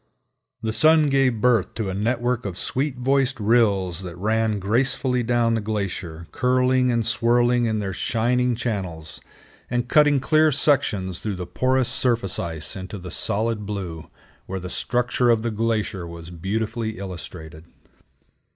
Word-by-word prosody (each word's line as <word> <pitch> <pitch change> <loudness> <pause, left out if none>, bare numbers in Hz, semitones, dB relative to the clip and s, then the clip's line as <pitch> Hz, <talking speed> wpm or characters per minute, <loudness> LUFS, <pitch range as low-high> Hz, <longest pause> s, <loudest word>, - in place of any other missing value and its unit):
The 110 -1 -1
sun 155 +5 +5
gave 135 -5 +2
birth 120 -5 +2
to 105 -4 -2
a - - -4
network 120 +4 -1
of 95 -4 -5
sweet 135 0 -1
voiced 135 0 +1
rills 100 -5 +2
that 90 -2 -7
ran 110 +2 0
gracefully 125 +5 0
down 120 -1 +1
the 115 - 0
glacier, 95 -6 -4
curling 125 0 +2
and 115 -2 0
swirling 120 +1 +2
in 110 -1 0
their 100 -2 -3
shining 120 +5 0
channels, 95 -9 -4 0.5
and 120 0 -1
cutting 145 0 +4
clear 155 +3 +3
sections 115 - +1
through 105 -3 -3
the 90 -1 -5
porous 130 +7 +1
surface 115 -7 +1
ice 80 -3 -4
into 95 +2 -7
the 90 -1 -8
solid 110 +1 -1
blue, 90 -6 -5 0.4
where 95 0 -4
the 90 -1 -7
structure 125 0 0
of 115 -2 +3
the 115 - -1
glacier 105 -5 -2
was 85 0 -9
beautifully 110 +5 -3
illustrated. 80 -4 -8
110 Hz, 150 wpm, -23 LUFS, 95-125 Hz, 0.5 s, sun